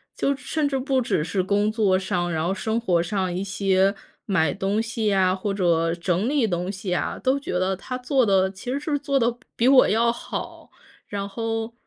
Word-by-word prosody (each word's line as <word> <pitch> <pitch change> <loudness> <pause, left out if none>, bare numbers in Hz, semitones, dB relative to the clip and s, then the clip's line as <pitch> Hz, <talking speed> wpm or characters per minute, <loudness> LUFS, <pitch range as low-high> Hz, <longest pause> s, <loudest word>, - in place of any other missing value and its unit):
就 280 - 0
甚 285 +3 -2
至 270 - -1
不 265 0 0
只 195 -9 0
是 180 +4 -1
工 205 +3 +1
作 210 -4 +2
上， 175 -2 -1
然 160 0 -1
后 185 - 0
生 220 +3 -1
活 180 -7 +1
上 185 0 -2
一 185 - -2
些 195 0 +1 0.3
买 160 -7 +2
东 195 +2 -1
西 225 -1 -2
呀， 190 -2 +3
或 195 +2 -3
者 170 -4 +1
整 180 +5 0
理 285 -4 +2
东 180 0 -2
西 190 -2 -4
啊， - - -2
都 265 +1 +1
觉 280 - -5
得 185 +1 0
他 250 +7 -6
做 255 +1 +1
得 190 -3 +3
其 195 +6 -7
实 275 - -1
是 290 -1 -1
做 280 -1 0
得 235 0 +2
比 240 - -15 0.2
比 235 - +2
我 265 -1 +6
要 230 +2 +3
好。 235 - -7 0.4
然 200 -1 -4
后， 225 +2 -3
200 Hz, 230 characters per minute, -24 LUFS, 185-240 Hz, 0.4 s, 我